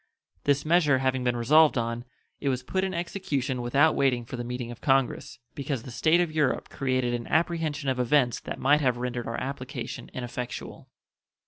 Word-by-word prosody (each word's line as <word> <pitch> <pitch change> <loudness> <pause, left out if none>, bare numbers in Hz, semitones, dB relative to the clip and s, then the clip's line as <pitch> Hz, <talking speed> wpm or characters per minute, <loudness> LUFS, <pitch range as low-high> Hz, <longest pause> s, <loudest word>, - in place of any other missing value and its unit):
This 140 0 +2
measure 155 -4 +4
having 130 -1 0
been 125 -1 +1
resolved 150 +5 +5
on, 115 +1 -2 0.3
it 140 - -1
was 130 -1 -1
put 190 0 -1
in 190 - -1
execution 170 -8 -2
without 140 +6 +3
waiting 125 -3 +1
for 125 - -7
the 120 - -4
meeting 125 0 -5
of 120 - -11
Congress, 135 -2 +1 0.2
because 140 -4 -3
the 125 - -9
state 155 +7 +3
of 175 -3 +1
Europe 150 -4 0
created 130 -3 0
an 120 -1 -3
apprehension 160 -3 0
of 130 -1 0
events 125 0 +2
that - - -6
might 145 +3 +3
have 125 -4 +2
rendered 120 -1 -3
our 115 - -3
application 130 -1 -5
ineffectual. 125 -1 -6
130 Hz, 185 wpm, -27 LUFS, 125-150 Hz, 0.3 s, resolved